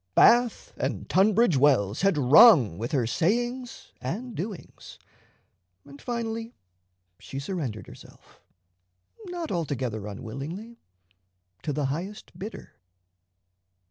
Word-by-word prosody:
Bath 240 0 +4
and - - -3
Tunbridge 200 - +3
Wells 125 -7 +3
had 195 -4 +2
rung 140 - +7
with 115 +2 -4
her 130 -5 +1
sayings 240 - -2
and 215 - -5
doings; 195 0 -8 0.9
and 140 0 -14
finally 230 -1 -4 0.6
she 135 - -9
surrendered 140 - -4
herself, - - -16 0.9
not 350 -3 -5
altogether 130 - -3
unwillingly, 145 - -7 0.8
to 150 - -3
the 145 0 -1
highest 190 +7 -7
bidder. 210 +4 -9
170 Hz, 100 wpm, -26 LUFS, -, 0.9 s, rung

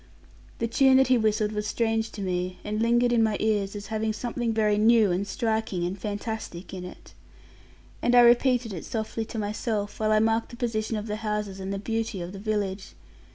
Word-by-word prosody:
The 230 - -1
tune 265 +3 +5
that 265 -1 +4
he 255 - +5
whistled 215 -1 +1
was 210 0 -3
strange 225 +1 0
to 205 - -5
me, 180 0 -2
and 210 +1 -2
lingered 240 +1 +3
in 235 - +4
my 220 -2 +2
ears, 210 -2 0
as 205 0 -6
having 220 0 0
something 240 +1 -2
very 210 -2 +2
new 220 -2 +5
and 190 +3 -1
striking, 220 -6 -1
and 180 +2 -2
fantastic 205 -2 -5
in 185 -1 -6
it. 180 - -11 0.9
And 245 - +2
I 245 - +9
repeated 240 -1 +4
it 170 - -6
softly 225 0 -3
to 225 - -7
myself, 210 0 -2
while 215 0 +1
I 215 - +5
marked 225 +1 +1
the 240 - -10
position 225 -2 -1
of 210 - -4
the 210 -1 -3
houses 210 -3 -3
and 190 0 -4
the 200 - -2
beauty 225 0 -3
of 175 0 -5
the 195 - -8
village. 200 -2 -3
215 Hz, 205 wpm, -26 LUFS, 205-230 Hz, 0.9 s, I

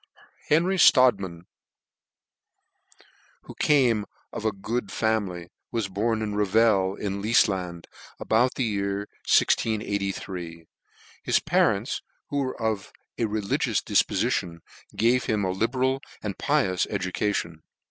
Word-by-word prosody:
HENRY 180 +5 +2
STRODTMAN, 100 - +4 2.0
who - - -11
came 120 -8 +3 0.3
of - - -5
x 105 - -1
good 110 +1 -3
family, 100 -6 -1 0.2
was 115 -4 -2
born 110 +3 -1
at 105 -1 -3
Revel, 105 -2 +3
in 100 -1 -4
Lifland, 95 -6 +1 0.3
about 120 +3 +2
the 130 - 0
year 100 -3 -1 0.3
1683. 95 -6 0 0.6
His - - +2
parents, - - +1 0.3
who 145 - -1
were 130 -2 -3
of 110 -3 -2 0.3
a 115 - +2
religious 105 -2 0
difpofition, 85 -1 0 0.3
gave 120 +3 +2
him 105 -2 0
a 95 - 0
libeial 130 +6 0 0.2
and 100 -3 -3
pi 150 -1 +1
ous 95 -1 0
education. 95 -4 -2
105 Hz, 115 wpm, -25 LUFS, 95-115 Hz, 2.0 s, STRODTMAN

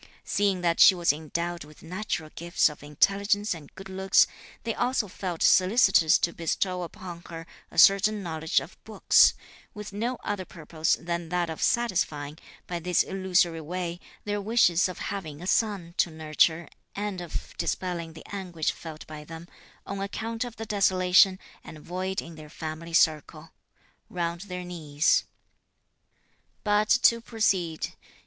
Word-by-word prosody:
Seeing 200 -3 0
that 170 -1 +1
she 190 - +8
was 170 -4 +2
endowed 170 +3 -4
with 150 0 -16
natural 170 -3 -4
gifts 170 -1 +2
of 150 - -12
intelligence 200 +8 +1
and 155 -4 -11
good 195 - -10
looks, 190 0 +4 0.4
they 230 - -2
also 250 -3 0
felt 180 -2 -4
solicitous 185 -4 +5
to 170 - -1
bestow 180 +2 -1
upon 175 0 -8
her 165 -1 -7 0.2
a - - -15
certain 200 +1 +5
knowledge 160 -2 0
of - - -12
books, - - +4 0.4
with 210 -1 -8
no 235 +5 -2
other 205 -2 -3
purpose 160 -2 -1
than 170 -1 -4
that 175 -1 -1
of 160 - -7
satisfying, 160 -10 0 0.3
by 175 -1 -4
this 180 +1 +2
illusory 180 -3 +1
way, 175 +2 -4 0.2
their 205 0 -2
wishes 195 -5 +3
of 180 - -7
having 160 -7 -5
a 175 - -8
son 195 -4 0
to - - +3
nurture 160 +1 +1 0.3
and 205 -2 -3
of 175 - -7
dispelling 170 -3 -3
the 160 - -12
anguish 180 -5 -2
felt 160 -2 -10
by 155 -1 -9
them, 165 +2 -10 0.4
on 200 0 -5
account 225 +3 -3
of 240 -2 -7
the 225 - -6
desolation 190 -2 +4 0.3
and 155 - -10
void 185 +4 -4
in 170 - -10
their 155 -1 -12
family 160 +1 -7
circle 155 -1 +1 0.6
(round 170 -1 -3
their 180 0 -5
knees). 160 -4 +1 1.4
But 210 0 +2
to 230 0 +5
proceed. 190 -9 -1
175 Hz, 150 wpm, -27 LUFS, 165-195 Hz, 1.4 s, she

